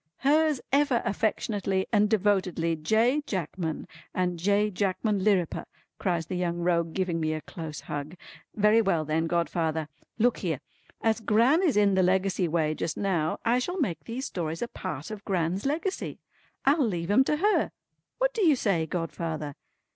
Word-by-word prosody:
"Hers 300 0 +3
ever 280 -3 +3
affectionately 200 -2 0
and 210 -1 +4
devotedly 185 -5 +1
J. 225 - +2
Jackman, 170 -3 -3 0.3
and 180 -2 0
J. 205 +4 +2
Jackman 200 +1 0
Lirriper," 190 -5 +1 0.3
cries 175 -4 0
the 185 - -6
Young 175 -1 -1
Rogue 170 -1 0
giving 185 -3 0
me 155 -1 0
a 155 - -4
close 160 -2 -7
hug. 145 +3 -5 0.4
"Very 210 +2 +5
well 170 -7 +1
then 160 +2 0
godfather. 160 -2 -1 0.3
Look 240 +1 +3
here. 160 -8 -2 0.4
As 225 0 +2
Gran 235 - +4
is 330 - +2
in 205 -1 +4
the 190 - +3
Legacy 185 0 +2
way 155 -1 +1
just 155 0 -3
now, 175 -6 0
I 240 +2 +3
shall 355 +9 -3
make 190 - -2
these 245 +4 -4
stories 165 - -3
a - - -2
part 185 - -6
of 210 -2 -7
Gran's 185 +3 -1
Legacy. 335 +7 -2 0.5
I'll 290 +3 +4
leave 175 -6 -1
'em 260 +6 +6
to 300 - +1
her. 415 +6 +2 0.5
What - - +1
do 445 - 0
you 315 -5 +6
say 190 -10 0
godfather?" 165 -3 -3
190 Hz, 165 wpm, -27 LUFS, 165-225 Hz, 0.5 s, em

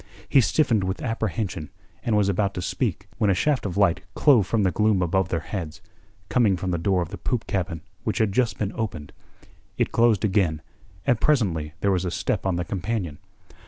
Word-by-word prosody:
He 135 - +5
stiffened 115 -3 +2
with 95 +1 -3
apprehension, 110 -7 -2 0.3
and 110 -3 +1
was 100 -2 +3
about 100 0 0
to 90 - -3
speak 90 - -2
when 105 - +3
a 95 - +3
shaft 140 +2 +1
of 95 - -5
light 100 -4 +3
clove 125 -10 +4
the 105 -5 +2
gloom 105 -2 +2
above 95 +2 +1
their 80 - -1
heads, 80 -6 -5 0.5
coming 110 -7 +3
from 90 +1 -2
the 85 - -1
door 90 +1 +1
of 80 - -8
the 100 - -8
poop 125 -4 -2
cabin 90 -4 -2 0.2
which - - -1
had 110 -2 +2
just 110 -3 +1
been 105 -1 -2
opened. 95 -10 -4 0.6
It - - +1
closed 115 -4 +3
again, 90 -7 +1 0.4
and 120 - +2
presently 85 - +1
there 100 - +2
was 90 -1 +1
a 90 - -1
step 90 - -1
on 95 - +1
the 85 0 -2
companion. 95 -3 -3
100 Hz, 195 wpm, -24 LUFS, 90-110 Hz, 0.6 s, He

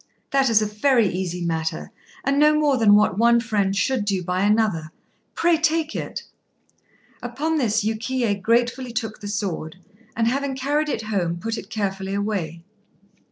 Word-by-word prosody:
"That 270 -2 +3
is 215 -2 +4
a 210 0 -6
very 255 -6 +4
easy 180 -1 -3
matter, 160 -1 -3 0.3
and 275 +1 +1
no 300 0 +5
more 290 -3 +2
than 215 -3 +6
what 210 -1 +3
one 235 +1 +5
friend 205 -4 0
should 245 +3 0
do 195 -3 -1
by 180 +1 -1
another. 205 -6 +1 0.5
Pray 340 -1 +3
take 320 -1 0
it." - - -5 1.0
Upon 295 +7 -2
this 220 -4 +1
Yukiyé 225 -1 -1
gratefully 240 +3 0
took 220 -1 -4
the 205 - -6
sword, 185 -6 -4 0.4
and 230 -1 +2
having 275 +2 -1
carried 290 +3 0
it 225 - -2
home 185 -6 -1
put 225 +5 -3
it - - -8
carefully 195 -3 -3
away. 190 -6 -3
220 Hz, 160 wpm, -23 LUFS, 195-260 Hz, 1.0 s, than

